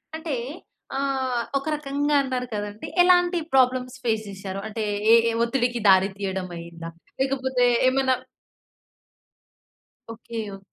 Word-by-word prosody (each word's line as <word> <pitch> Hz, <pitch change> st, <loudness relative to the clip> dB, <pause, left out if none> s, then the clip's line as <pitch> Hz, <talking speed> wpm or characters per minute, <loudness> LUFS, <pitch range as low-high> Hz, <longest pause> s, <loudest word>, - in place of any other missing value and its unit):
అంటే 320 Hz, -2 st, -4 dB, 0.6 s
ఆహ్, 265 Hz, -3 st, 0 dB, 0.2 s
ఒక 275 Hz, -, -5 dB
రకంగా 290 Hz, 0 st, -1 dB
అన్నారు 255 Hz, -2 st, -2 dB
కదండీ! 205 Hz, 0 st, -5 dB
ఎలాంటి 355 Hz, 0 st, +4 dB
ప్రాబ్లమ్స్ 255 Hz, -1 st, +2 dB
ఫేస్ 220 Hz, -2 st, 0 dB
చేసారు? 195 Hz, 0 st, -6 dB
అంటే 220 Hz, 0 st, -4 dB, 0.3 s
ఏ -, -, +9 dB
ఏ -, -, 0 dB
ఒత్తిడికి 240 Hz, 0 st, 0 dB
దారి 190 Hz, 0 st, +6 dB
తీయడమయిందా? 175 Hz, -4 st, -5 dB, 0.3 s
లేకపోతే 260 Hz, -2 st, 0 dB, 0.2 s
ఏమన్నా 260 Hz, 0 st, +3 dB, 2.0 s
ఓకే. 230 Hz, 0 st, -7 dB, 0.2 s
ఓకే. -, -, -12 dB
250 Hz, 110 wpm, -24 LUFS, 205-270 Hz, 2.0 s, ఏ